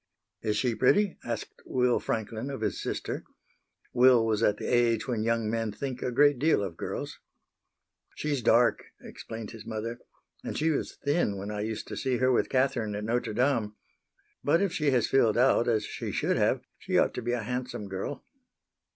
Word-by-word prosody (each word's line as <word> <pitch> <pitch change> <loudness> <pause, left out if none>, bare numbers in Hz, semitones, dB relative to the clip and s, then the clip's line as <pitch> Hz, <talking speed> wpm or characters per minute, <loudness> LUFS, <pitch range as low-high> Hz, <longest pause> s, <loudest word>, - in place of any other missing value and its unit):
"Is 105 -2 0
she 120 +2 +1
pretty?" 195 - +2
asked 115 -2 -5
Will 125 -1 +1
Franklin 110 +3 -3
of 135 - -5
his - - -1
sister. - - -3 0.7
Will 125 -2 +6
was 110 -1 0
at 105 -2 +3
the - - -6
age 120 -1 +2
when 120 -4 -1
young 115 0 0
men 115 0 -1
think 130 +4 -5
a 125 - -1
great 145 +1 +4
deal 155 -7 +3
of 95 -4 -5
girls. - - -5 1.0
"She's 145 -3 -1
dark," 115 +1 +4 0.2
explained 110 -1 -8
his 115 -2 -10
mother, 115 +1 -5 0.4
"and - - -4
she 160 +1 +2
was 145 - -2
thin 145 - +1
when 100 +2 -5
I 105 0 -3
used 110 0 -4
to - - -5
see 130 -2 0
her 130 +2 +3
with 125 - +2
Catherine 130 -5 +1
at 105 - -4
Notre 115 +1 -1
Dame. 120 -4 +1 0.7
But 155 +4 +3
if 195 -2 0
she 150 -2 +1
has 125 -4 +3
filled 115 -5 +3
out 125 -1 +4
as 110 -3 +1
she - - -5
should - - 0
have, - - +2 0.2
she - - 0
ought - - +3
to - - -4
be 120 +1 -1
a 120 -2 -1
handsome 125 -2 -4
girl." 95 +8 -5
120 Hz, 190 wpm, -28 LUFS, 110-130 Hz, 1.0 s, Will